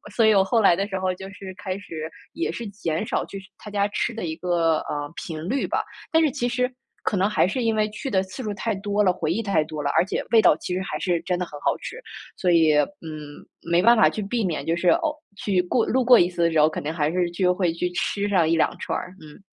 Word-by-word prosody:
所 230 - +4
以 220 - +6
我 195 - +5
后 225 +4 +2
来 195 -5 +5
的 195 +3 -1
时 190 -2 -3
候， 185 0 0
就 190 +1 -9
是 195 -1 -9
开 190 -1 -2
始 160 -6 -7 0.2
也 335 - -2
是 235 - -6
减 195 -2 -3
少 - - -1
去 195 - -7 0.2
它 210 - -9
家 200 0 +1
吃 220 +3 -1
的 225 -4 -5
一 160 -1 -3
个 170 -3 +1
呃， 145 +1 -5
频 160 +1 -6
率 270 +5 0
吧。 - - 0 0.3
但 320 - +4
是 295 - +2
其 245 -3 -1
实， 250 +1 0 0.3
可 - - 0
能 195 +2 +2
还 185 -3 +3
是 250 +5 -2
因 225 -1 +1
为 215 0 +2
去 270 +6 -5
的 190 -1 +3
次 190 +7 -8
数 215 - -3
太 225 +3 -1
多 205 +1 0
了， 185 - +4
回 160 - -2
忆 220 - 0
太 200 -7 +2
多 155 -1 -5
了， 140 - 0
而 - - +6
且 - - -2
味 225 - +6
道 195 - +6
其 180 - -5
实 185 - -1
还 190 - -4
是 175 -3 0
真 180 - -1
的 180 - -1
很 - - -17
好 - - +1
吃， 470 - -7 0.4
所 180 - 0
以 160 -3 +5
嗯， 155 -3 -4 0.3
没 170 +1 +5
办 235 +1 +7
法 - - +6
去 215 - -4
避 230 +3 -1
免， 155 -5 -2
就 165 - +1
是 175 +1 +2
偶 325 -3 +2 0.2
去 190 -3 +1
过 225 +6 +1
路 260 +1 +1
过 245 -1 +8
一 175 - +4
次 175 -1 -4
的 170 - +3
时 160 - +2
候， 150 - +6
肯 - - -5
定 155 - -3
还 155 -2 0
是 175 -1 0
就 180 +1 +2
会 180 -2 +1
去 180 +1 -2
吃 200 +3 -1
上 180 -5 +3
1、2 165 0 +2
串 - - -2
儿， 185 0 -9
嗯。 155 +4 -13
190 Hz, 290 characters per minute, -24 LUFS, 170-215 Hz, 0.4 s, 过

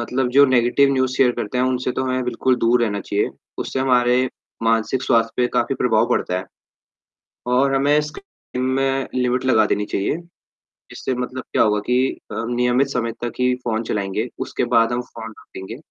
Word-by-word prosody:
मतलब 125 +2 -1
जो 140 +3 +7
negative 130 +2 +3
news 130 -1 +1
share 130 -2 +4
करते 120 +1 -3
हैं 125 - +3
उनसे 130 0 0
तो 130 - -2
हमें 130 0 -1
बिल्कुल 125 +1 +1
दूर 120 +1 +2
रहना 100 -3 -1
चाहिए, 100 +1 -1 0.3
उससे - - -3
हमारे 125 -1 +3 0.3
मानसिक 115 +3 +1
स्वास्थ्य 115 -3 +2
पे 125 - +3
काफ़ी 120 +3 +1
प्रभाव 115 -3 +2
पड़ता 90 - 0
है, 95 - -6 1.0
और 130 +2 +2
हमें 145 +2 +3
स्क्रीन 150 - -8
में 135 +1 0
लिमिट 125 0 0
लगा 110 -5 +4
देनी 105 - 0
चाहिए, 100 +8 -1 0.8
इससे 130 - -3
मतलब 125 +1 -4
क्या - - +4
होगा 105 -1 +2
कि 125 +1 +2 0.2
अ, - - -6
नियमित 125 +2 +2
समय 115 -4 -2
तक 120 -1 -2
ही 125 0 +3
फोन 110 -1 -1
चलाएँगे, 105 +2 -2
उसके - - -2
बाद 115 +1 +4
हम 120 - 0
फोन 115 -2 -9
रखेंगे। 95 +4 -9
125 Hz, 180 wpm, -21 LUFS, 115-130 Hz, 1.0 s, जो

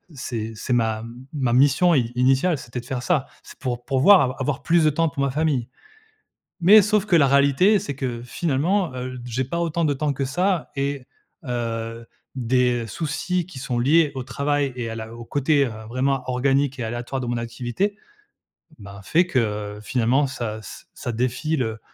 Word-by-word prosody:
C'est 115 -3 -4
c'est 125 - -2
ma 110 -2 +1
m 120 +3 -10
ma 130 -5 0
mission 145 +7 +4
i 120 -4 +1
initiale, 135 +7 +3
c'était 120 +1 -6
de - - -18
faire 130 -1 -3
ça, 155 -7 +1 0.2
c'est - - -14
pour 120 -2 -3
pourvoir 135 +9 +6
av 130 -1 0
avoir 135 0 -2
plus 170 -1 +3
de 155 - +6
temps 165 +2 +1
pour 140 - -2
ma 140 - 0
famille. 140 -5 0 0.9
Mais 210 +5 +9
sauf 210 0 +2
que 180 - +4
la 145 -4 +5
réalité, 140 +9 +4
c'est 165 -8 -5
que 125 -4 -4
finalement, 160 - 0
heu, 130 0 -5
d - - -10
j'ai 125 +2 -2
pas 170 +7 -3
autant 170 0 0
de 145 - +2
temps 145 +1 -1
que 135 - -2
ça, 180 +4 0
et 140 -1 -2 0.4
heu, 115 -1 -4 0.3
des 125 -1 +1
soucis 170 - -2
qui 150 -8 -10
sont 125 -1 -2
liés 150 +4 +4
au 130 - -2
travail 140 +1 -1
et 120 -2 -3
à - - -5
la 110 +1 -7
au 120 0 -9
côté, 145 +1 +2
heu, - - -4 0.2
vraiment 130 +2 0
organique 135 +2 +1
et 120 - -3
aléatoire 120 +3 -4
de 125 - -4
mon 120 0 -1
activité, 120 - -2 0.8
ben, 100 -1 -10
fait 175 - +2
que 105 -7 -1
finalement 125 +4 +2
ça 110 -4 -4
ç - - -11
ça 120 - -4
défie 130 +7 -1
le 110 -4 -2
130 Hz, 195 wpm, -23 LUFS, 120-150 Hz, 0.9 s, Mais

